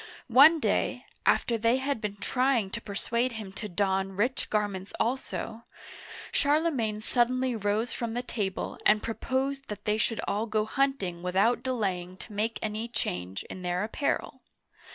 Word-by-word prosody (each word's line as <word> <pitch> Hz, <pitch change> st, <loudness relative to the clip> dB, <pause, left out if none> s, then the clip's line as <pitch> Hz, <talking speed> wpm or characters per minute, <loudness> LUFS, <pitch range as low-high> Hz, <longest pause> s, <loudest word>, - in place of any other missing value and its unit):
OnQ 295 Hz, +6 st, +8 dB
day, -, -, 0 dB, 0.2 s
after 230 Hz, -1 st, +3 dB
they 230 Hz, +3 st, +3 dB
had 265 Hz, -3 st, -1 dB
been 210 Hz, -1 st, -3 dB
trying 245 Hz, -1 st, +1 dB
to 230 Hz, -, -4 dB
persuade 235 Hz, +4 st, -1 dB
him 215 Hz, -4 st, -6 dB
to 210 Hz, +2 st, -6 dB
don 195 Hz, +1 st, 0 dB
rich 235 Hz, +7 st, 0 dB
garments 205 Hz, -2 st, -1 dB
also, 235 Hz, -2 st, -2 dB, 0.7 s
Charlemagne 285 Hz, -8 st, +1 dB
suddenly 250 Hz, +2 st, +1 dB
rose 215 Hz, +2 st, 0 dB
from 235 Hz, -1 st, -3 dB
the 245 Hz, -, -1 dB
table 200 Hz, -6 st, -3 dB
and 210 Hz, 0 st, +4 dB
proposed 270 Hz, +4 st, -2 dB
that 210 Hz, -1 st, -7 dB
they 210 Hz, 0 st, +1 dB
should 225 Hz, 0 st, 0 dB
all 215 Hz, +3 st, 0 dB
go 215 Hz, -1 st, +1 dB
hunt 270 Hz, +1 st, +1 dB
ing 175 Hz, -2 st, -4 dB
without 195 Hz, +7 st, +2 dB
delaying 190 Hz, -8 st, -2 dB
to 210 Hz, -, -10 dB
make 220 Hz, +3 st, -1 dB
any 220 Hz, +1 st, -2 dB
change 95 Hz, -, -3 dB
in 185 Hz, -, -8 dB
their 180 Hz, +1 st, 0 dB
apparel. 230 Hz, +6 st, -2 dB
220 Hz, 155 wpm, -29 LUFS, 200-250 Hz, 0.7 s, OnQ